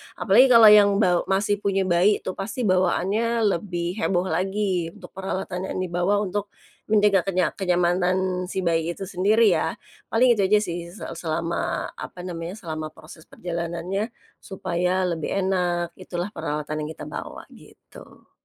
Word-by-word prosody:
apalagi 265 - +5
kalau 230 -4 +8
yang 205 -1 +6
baw 180 -4 +2
masih 200 +1 +1
punya 195 -1 0
bayi 185 +3 +2
itu 185 - -3
pasti 200 +6 -5
bawaannya 200 +4 +1 0.2
lebih 175 0 -4
heboh 180 -2 +1
lagi 190 -2 -1
untuk 190 -4 -13
peralatan 190 -1 -4
yang - - -5
dibawa 180 +4 0
untuk 205 +1 -3 0.4
menjaga 210 -2 +4
kenya 185 -2 +1
kenyamanan 180 0 0
si 190 +1 -3
bayi 165 0 0
itu - - -7
sendiri 200 +4 +3
ya. - - 0 0.3
Paling 245 +2 +4
itu 195 - +3
aja 210 - +4
sih 175 -2 -5
se 180 +4 -11 0.2
selama 165 +1 -2
apa 180 - -8
namanya 175 0 -5
selama 155 -6 -5
proses 160 0 -14
perjalanannya 175 +4 -4 0.3
supaya 180 0 -1
lebih 170 -4 -2
enak, 180 -3 0
itulah 180 +2 -5
peralatan 150 -2 -4
yang 150 0 -4
kita - - -9
bawa - - -7
gitu. - - -17
185 Hz, 150 wpm, -24 LUFS, 175-200 Hz, 0.4 s, kalau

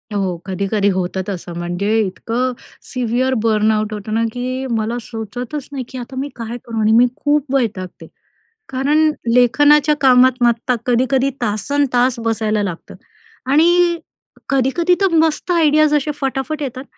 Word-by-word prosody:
हो, 185 -3 -1
कधी-कधी 200 +2 -1
होतं 185 0 -2
तसं 175 -3 -6
म्हणजे 185 +6 -1
इतकं 235 +7 -2 0.4
सिव्हिअर 250 +1 0
बर्नआउट 215 -1 +1
होतं 210 +1 -5
ना, 225 +1 +1
की 255 +2 -3
मला 225 +2 -2
सुचतच 245 +6 -6
नाही 265 -2 -4
की 260 - -8
आता 250 +2 -8
मी 285 +1 -3
काय 230 +1 -6
करू? 230 -1 -6
आणि 215 +1 +3
मी 235 +2 +6
खूप 290 -2 0
वैतागते. 205 -8 -3 0.6
कारण 295 +4 +2 0.2
लेखनाच्या 290 +4 +4
कामात 255 -1 +4
मात्र 240 +1 +2
कधी-कधी 260 +2 +2
तासन् 240 +7 0
तास 245 0 +2
बसायला 220 -2 0
लागतं. 180 -4 -6 0.6
आणि 345 +2 +4 0.5
कधी-कधी 275 +7 +2
तर 385 -4 +2
मस्त 320 +2 +1
आयडियाज 310 -3 +3
असे 300 0 +1
फटाफट 270 +3 -2
येतात. 260 0 -5
250 Hz, 140 wpm, -18 LUFS, 215-280 Hz, 0.6 s, मी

